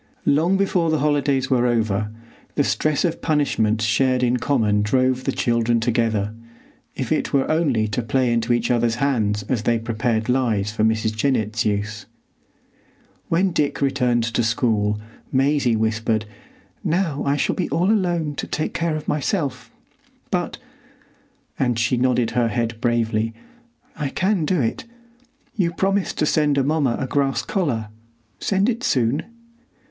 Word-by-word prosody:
Long 165 Hz, +7 st, +3 dB
before 185 Hz, -4 st, +1 dB
the 155 Hz, -, +2 dB
holidays 140 Hz, -3 st, +1 dB
were 125 Hz, -1 st, +3 dB
over, 110 Hz, -3 st, 0 dB, 0.5 s
the 145 Hz, -, +3 dB
stress 155 Hz, +2 st, +1 dB
of 165 Hz, -, -2 dB
punishment 115 Hz, -8 st, +1 dB
shared 125 Hz, +3 st, +2 dB
in 125 Hz, 0 st, +2 dB
common 115 Hz, -5 st, +1 dB
drove 130 Hz, +4 st, +1 dB
the -, -, +1 dB
children 115 Hz, 0 st, +1 dB
together, 110 Hz, -3 st, 0 dB, 0.6 s
if -, -, -4 dB
it -, -, 0 dB
were 135 Hz, -1 st, +2 dB
only 140 Hz, -9 st, +1 dB
to 105 Hz, +4 st, -1 dB
play 120 Hz, +1 st, +1 dB
into 115 Hz, +1 st, 0 dB
each 120 Hz, 0 st, +1 dB
other's 120 Hz, -1 st, +2 dB
hands 110 Hz, -6 st, 0 dB
as 115 Hz, +1 st, -1 dB
they 115 Hz, +1 st, +1 dB
prepared 115 Hz, 0 st, -1 dB
lies 115 Hz, -5 st, +1 dB
for 110 Hz, 0 st, -1 dB
Mrs. 110 Hz, 0 st, +1 dB
Jennett's 115 Hz, -2 st, 0 dB
use. 105 Hz, +1 st, -2 dB, 1.2 s
When 185 Hz, +3 st, +2 dB
Dick 150 Hz, -3 st, 0 dB
returned 125 Hz, -4 st, +1 dB
to 115 Hz, +1 st, 0 dB
school, 110 Hz, -3 st, +1 dB, 0.3 s
Maisie 135 Hz, -2 st, +2 dB
whispered, 110 Hz, 0 st, 0 dB, 0.6 s
"Now 165 Hz, -4 st, 0 dB
I 140 Hz, +1 st, +1 dB
shall -, -, +1 dB
be -, -, -2 dB
all 175 Hz, +8 st, +2 dB
alone 175 Hz, -7 st, 0 dB
to -, -, -3 dB
take 155 Hz, -, -2 dB
care 165 Hz, -2 st, -1 dB
of 155 Hz, -1 st, -6 dB
myself; 140 Hz, -, -1 dB, 0.6 s
but," -, -, -1 dB, 1.0 s
and 125 Hz, -3 st, +1 dB
she 120 Hz, +2 st, +1 dB
nodded 125 Hz, -1 st, +1 dB
her 120 Hz, -1 st, +1 dB
head 115 Hz, 0 st, -2 dB
bravely, 115 Hz, -2 st, 0 dB, 0.6 s
"I 150 Hz, -3 st, -2 dB
can 185 Hz, +1 st, 0 dB
do 180 Hz, +2 st, +1 dB
it. 115 Hz, -, -2 dB, 0.7 s
You 180 Hz, -5 st, +1 dB
promised 195 Hz, +3 st, 0 dB
to -, -, +2 dB
send 150 Hz, -2 st, +2 dB
Amomma 140 Hz, -2 st, +1 dB
a -, -, -1 dB
grass 135 Hz, +1 st, 0 dB
collar. 125 Hz, -, -1 dB, 0.5 s
Send 195 Hz, +1 st, +1 dB
it 240 Hz, -1 st, -1 dB
soon." 125 Hz, +3 st, +1 dB
125 Hz, 150 wpm, -22 LUFS, 115-150 Hz, 1.2 s, Long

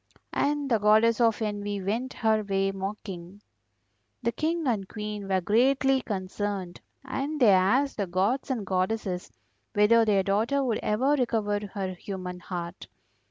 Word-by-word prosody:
And 290 Hz, 0 st, 0 dB
the 225 Hz, -, +4 dB
Goddess 220 Hz, +3 st, +4 dB
of 225 Hz, -1 st, +3 dB
Envy 205 Hz, -1 st, -3 dB
went 225 Hz, +7 st, -2 dB
her 220 Hz, -2 st, +2 dB
way 195 Hz, -1 st, 0 dB
mocking. 195 Hz, -1 st, -6 dB, 0.8 s
The 235 Hz, -, +1 dB
King 320 Hz, +4 st, -1 dB
and 210 Hz, -7 st, -1 dB
Queen 210 Hz, -2 st, -5 dB
were 190 Hz, -1 st, +1 dB
greatly 265 Hz, +6 st, +3 dB
concerned, 195 Hz, -3 st, -4 dB, 0.2 s
and 280 Hz, +3 st, -3 dB
they 235 Hz, -6 st, +6 dB
asked 200 Hz, +10 st, +3 dB
the 200 Hz, -3 st, -1 dB
gods 195 Hz, +11 st, 0 dB
and 235 Hz, -6 st, -2 dB
goddesses 185 Hz, 0 st, -2 dB, 0.4 s
whether 220 Hz, +3 st, +5 dB
their 205 Hz, -3 st, +3 dB
daughter 225 Hz, +9 st, +1 dB
would 235 Hz, -4 st, 0 dB
ever 250 Hz, +7 st, +1 dB
recover 220 Hz, -6 st, 0 dB, 0.2 s
her 190 Hz, -2 st, -2 dB
human 180 Hz, -1 st, -6 dB
heart. 175 Hz, -1 st, -6 dB
210 Hz, 145 wpm, -27 LUFS, 195-240 Hz, 0.8 s, they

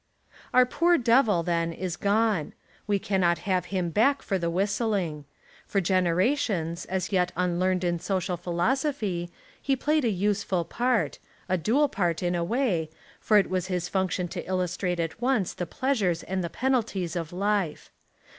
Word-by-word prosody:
Our 255 Hz, 0 st, +6 dB
poor 340 Hz, +7 st, +3 dB
Devil 230 Hz, -, +3 dB
then 170 Hz, -1 st, 0 dB
is 175 Hz, 0 st, -4 dB
gone. 205 Hz, -5 st, +1 dB, 0.3 s
We 205 Hz, -1 st, +2 dB
cannot 185 Hz, -3 st, +1 dB
have 185 Hz, -2 st, +1 dB
him 180 Hz, -3 st, -2 dB
back 270 Hz, -, +2 dB
for 195 Hz, -2 st, -1 dB
the 170 Hz, -1 st, -1 dB
whistling. 190 Hz, -4 st, -1 dB, 0.4 s
For 200 Hz, -, +1 dB
genera 185 Hz, -, +2 dB
tions, 170 Hz, -, -2 dB
as 185 Hz, +1 st, -3 dB
yet 180 Hz, -2 st, +2 dB
unlearned 180 Hz, +1 st, +1 dB
in 175 Hz, -1 st, 0 dB
social 185 Hz, -1 st, -1 dB
philosophy, 180 Hz, -, -1 dB, 0.3 s
he 275 Hz, -, +1 dB
played 300 Hz, +3 st, +1 dB
a 235 Hz, -, +2 dB
useful 195 Hz, -3 st, 0 dB
part 245 Hz, +2 st, 0 dB, 0.2 s
— -, -, -31 dB
a 185 Hz, -, +1 dB
dual 235 Hz, -, +2 dB
part 175 Hz, -, -1 dB
in 175 Hz, 0 st, +1 dB
a 170 Hz, -1 st, 0 dB
way, 185 Hz, -, 0 dB, 0.3 s
for 215 Hz, -, +3 dB
it 200 Hz, -, +4 dB
was 185 Hz, -1 st, -1 dB
his 180 Hz, -2 st, -2 dB
function 190 Hz, -2 st, 0 dB
to 180 Hz, -1 st, -5 dB
illustrate 180 Hz, -1 st, -1 dB
at 165 Hz, +7 st, -3 dB
once 245 Hz, -7 st, +1 dB
the 175 Hz, -, -4 dB
pleasures 205 Hz, -11 st, 0 dB
and 185 Hz, 0 st, -2 dB
the 170 Hz, -, -3 dB
penalties 220 Hz, -8 st, -1 dB
of 165 Hz, -2 st, -3 dB
life. 195 Hz, -3 st, -1 dB
185 Hz, 165 wpm, -27 LUFS, 175-220 Hz, 0.4 s, Our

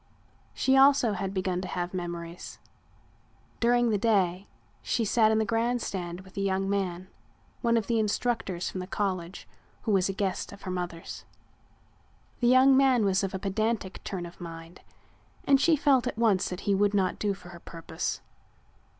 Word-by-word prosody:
She 265 Hz, -, +2 dB
also 270 Hz, -4 st, +5 dB
had 195 Hz, 0 st, -3 dB
begun 185 Hz, -2 st, -1 dB
to 185 Hz, -, -5 dB
have 175 Hz, 0 st, -4 dB
memories. 170 Hz, -1 st, -6 dB, 1.0 s
During 240 Hz, 0 st, +3 dB
the 205 Hz, -, +1 dB
day 195 Hz, -4 st, +1 dB, 0.3 s
she 230 Hz, -, -1 dB
sat 220 Hz, +1 st, +3 dB
in 220 Hz, -, +2 dB
the 220 Hz, -, +1 dB
grand 230 Hz, +3 st, 0 dB
stand 180 Hz, -4 st, -5 dB
with 190 Hz, 0 st, -17 dB
a -, -, 0 dB
young 195 Hz, 0 st, 0 dB
man, 185 Hz, -2 st, -2 dB, 0.5 s
one 235 Hz, -1 st, +2 dB
of 225 Hz, -, 0 dB
the 230 Hz, +1 st, +1 dB
instructors 215 Hz, -4 st, -1 dB
from 185 Hz, -, -4 dB
the 180 Hz, -, -5 dB
college, 185 Hz, -3 st, -3 dB, 0.4 s
who 220 Hz, -, 0 dB
was 195 Hz, -1 st, +2 dB
a -, -, -1 dB
guest 195 Hz, -1 st, -2 dB
of 200 Hz, -, -13 dB
her 185 Hz, -, -4 dB
mother's. 175 Hz, -2 st, -5 dB, 1.2 s
The 240 Hz, -, +2 dB
young 260 Hz, +2 st, +6 dB
man 260 Hz, -5 st, +4 dB
was 195 Hz, 0 st, +2 dB
of 195 Hz, 0 st, -2 dB
a -, -, 0 dB
pedantic 200 Hz, +1 st, -2 dB
turn 180 Hz, -3 st, -4 dB
of 175 Hz, +1 st, -12 dB
mind 165 Hz, 0 st, -9 dB, 0.6 s
and 275 Hz, -1 st, +4 dB
she 330 Hz, +1 st, +5 dB
felt 275 Hz, -4 st, +3 dB
at -, -, -4 dB
once 215 Hz, -5 st, +2 dB
he 185 Hz, +2 st, -1 dB
would 205 Hz, +1 st, +2 dB
not 190 Hz, -2 st, +1 dB
do 205 Hz, -2 st, 0 dB
for 180 Hz, -, -14 dB
her 175 Hz, -1 st, -11 dB
purpose. 165 Hz, -1 st, -5 dB
195 Hz, 175 wpm, -28 LUFS, 180-230 Hz, 1.2 s, young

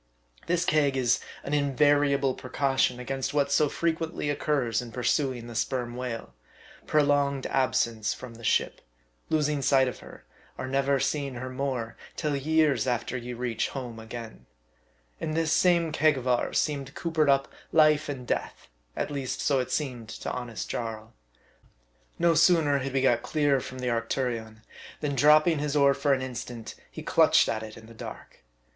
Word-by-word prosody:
This 175 Hz, 0 st, +1 dB
keg 145 Hz, -5 st, +2 dB
is 125 Hz, -3 st, +2 dB, 0.2 s
an 145 Hz, -, -4 dB
in 140 Hz, -2 st, +1 dB
variable 145 Hz, -1 st, +3 dB
precaution 130 Hz, -1 st, 0 dB
against 135 Hz, +2 st, -3 dB
what 140 Hz, -1 st, +2 dB
so 150 Hz, +1 st, +3 dB
frequently 165 Hz, -2 st, -1 dB
occurs 140 Hz, -6 st, 0 dB
in 120 Hz, -1 st, -9 dB
pursuing 125 Hz, +1 st, 0 dB
the 120 Hz, -, -8 dB
sperm 120 Hz, +2 st, -2 dB
whale 125 Hz, -, -5 dB, 0.5 s
prolonged 145 Hz, -2 st, +2 dB
absence 115 Hz, -4 st, +1 dB
from 125 Hz, -2 st, -7 dB
the 115 Hz, 0 st, -13 dB
ship, -, -, +1 dB, 0.5 s
losing 150 Hz, -2 st, +1 dB
sight 135 Hz, -1 st, +4 dB
of 125 Hz, -, -5 dB
her, -, -, -13 dB, 0.3 s
or -, -, -4 dB
never 135 Hz, +1 st, +1 dB
seeing 140 Hz, 0 st, -1 dB
her 130 Hz, +1 st, -5 dB
more, 130 Hz, -4 st, -3 dB, 0.2 s
till 150 Hz, -3 st, -1 dB
years 155 Hz, 0 st, +2 dB
after 120 Hz, 0 st, -1 dB
you 120 Hz, -1 st, -5 dB
reach 120 Hz, -2 st, -1 dB
home 125 Hz, -4 st, -6 dB
again. 110 Hz, -, -9 dB, 0.7 s
In 155 Hz, -, -3 dB
this 160 Hz, -1 st, +1 dB
same 170 Hz, -3 st, +3 dB
keg 155 Hz, -1 st, +3 dB
of 130 Hz, 0 st, -5 dB
ours 125 Hz, -1 st, +1 dB
seemed 140 Hz, -3 st, -1 dB
coopered 160 Hz, -3 st, +1 dB
up 135 Hz, 0 st, +3 dB, 0.2 s
life 155 Hz, -1 st, +4 dB
and 130 Hz, -3 st, -5 dB
death, -, -, -3 dB, 0.3 s
at -, -, -2 dB
least 135 Hz, -3 st, -3 dB
so 135 Hz, -3 st, +2 dB
seemed 130 Hz, -4 st, -3 dB
it -, -, -7 dB
to -, -, -3 dB
honest 120 Hz, -6 st, -5 dB
Jarl. 110 Hz, -2 st, -5 dB, 1.0 s
No 170 Hz, 0 st, +3 dB
sooner 160 Hz, -3 st, +4 dB
had 135 Hz, 0 st, -4 dB
we 135 Hz, -, +2 dB
got 120 Hz, -3 st, +3 dB
clear 145 Hz, -2 st, +1 dB
from 130 Hz, -, -8 dB
the 125 Hz, -1 st, -2 dB
Arctu 120 Hz, +3 st, -1 dB
rion, 110 Hz, -2 st, -7 dB, 0.4 s
than 145 Hz, -2 st, -2 dB
dropping 150 Hz, +4 st, +5 dB
his 150 Hz, 0 st, -2 dB
oar 140 Hz, -1 st, +5 dB
for 140 Hz, +1 st, 0 dB
an 130 Hz, -1 st, +2 dB
instant, 120 Hz, -3 st, -6 dB, 0.2 s
he -, -, -9 dB
clutched -, -, +4 dB
at 110 Hz, -, -1 dB
it 110 Hz, -1 st, -9 dB
in 110 Hz, -, -12 dB
the 115 Hz, -, -13 dB
dark. 110 Hz, -, -10 dB
135 Hz, 170 wpm, -27 LUFS, 120-145 Hz, 1.0 s, dropping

